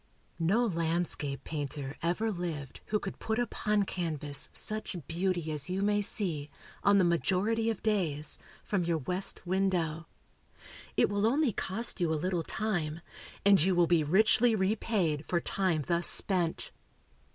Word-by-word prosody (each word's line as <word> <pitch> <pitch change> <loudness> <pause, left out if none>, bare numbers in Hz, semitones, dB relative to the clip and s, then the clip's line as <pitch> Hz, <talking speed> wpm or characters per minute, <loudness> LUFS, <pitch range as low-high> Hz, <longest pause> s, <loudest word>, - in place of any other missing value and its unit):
No 200 +9 +3
landscape 165 -6 -1
painter 145 -2 -4
ever 180 +7 0
lived 165 -7 -5
who 210 - +1
could 200 -2 -6
put 220 0 -1
upon 210 -3 +1
canvas 155 -7 -1
such 215 -2 -2
beauty 175 -2 -1
as 150 0 -4
you 190 +2 -1
may 205 0 +2
see, 165 -8 -1 0.3
on 200 0 +5
the 190 - +5
majority 190 +6 +1
of 225 - -3
days, 165 -9 0 0.2
from 195 -4 0
your 170 -1 +1
west 180 +8 -2
window. 175 -4 0 0.9
It - - +5
will 205 +1 +1
only 275 -1 +2
cost 205 +2 -2
you 170 -2 +2
a - - +2
little 180 +2 -1
time, 170 -4 -2 0.4
and 200 -3 +6
you 185 +3 +3
will 175 0 +5
be 170 -2 +3
richly 215 +8 +4
repaid 190 -6 0
for 175 - +1
time 175 -4 0
thus 170 0 +1
spent. 175 -4 0
180 Hz, 150 wpm, -31 LUFS, 160-205 Hz, 0.9 s, and